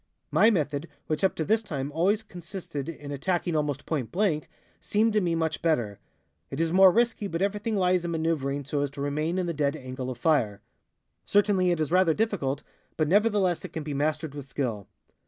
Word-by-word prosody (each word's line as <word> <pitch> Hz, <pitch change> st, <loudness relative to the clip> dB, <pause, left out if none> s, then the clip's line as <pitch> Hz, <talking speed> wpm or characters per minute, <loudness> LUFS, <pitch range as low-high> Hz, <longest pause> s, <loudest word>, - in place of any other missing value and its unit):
My 220 Hz, -, +6 dB
method, 150 Hz, -6 st, 0 dB, 0.2 s
which 155 Hz, +1 st, -2 dB
up 190 Hz, -, +3 dB
to 160 Hz, -, -2 dB
this 220 Hz, +4 st, +3 dB
time 140 Hz, -8 st, -4 dB
always 195 Hz, +8 st, +1 dB
consisted 175 Hz, -6 st, -7 dB
in 145 Hz, -3 st, -7 dB
attacking 170 Hz, +4 st, -1 dB
almost 145 Hz, -2 st, -1 dB
point 135 Hz, -9 st, -2 dB
blank, 175 Hz, -6 st, 0 dB, 0.3 s
seemed 220 Hz, +1 st, +1 dB
to 210 Hz, -, +3 dB
me 170 Hz, -2 st, +1 dB
much 160 Hz, -1 st, -1 dB
better. 120 Hz, -12 st, 0 dB, 0.5 s
It 135 Hz, -, -5 dB
is 165 Hz, 0 st, +1 dB
more 190 Hz, 0 st, +8 dB
risky, 230 Hz, -1 st, +1 dB
but 165 Hz, -3 st, -3 dB
everything 210 Hz, +2 st, -1 dB
lies 180 Hz, -2 st, +2 dB
in 170 Hz, -, -2 dB
maneuvering 155 Hz, -4 st, -1 dB
so 145 Hz, +1 st, -1 dB
as 145 Hz, -, 0 dB
to -, -, -4 dB
remain 155 Hz, +5 st, -1 dB
in 185 Hz, -, 0 dB
the 170 Hz, -, -2 dB
dead 145 Hz, -1 st, 0 dB
angle 130 Hz, -2 st, -6 dB
of 125 Hz, -, -5 dB
fire. 120 Hz, -8 st, +1 dB, 0.6 s
Certainly 200 Hz, -3 st, +3 dB
it 175 Hz, -2 st, +1 dB
is 155 Hz, 0 st, -1 dB
rather 180 Hz, -3 st, +4 dB
difficult, 160 Hz, -11 st, -1 dB, 0.3 s
but 155 Hz, -, +2 dB
nevertheless 200 Hz, -1 st, +2 dB
it -, -, -8 dB
can 160 Hz, -, -4 dB
be 150 Hz, -1 st, -4 dB
mastered 155 Hz, +1 st, -1 dB
with 145 Hz, -2 st, -8 dB
skill. 120 Hz, -7 st, -3 dB
160 Hz, 200 wpm, -27 LUFS, 145-185 Hz, 0.6 s, more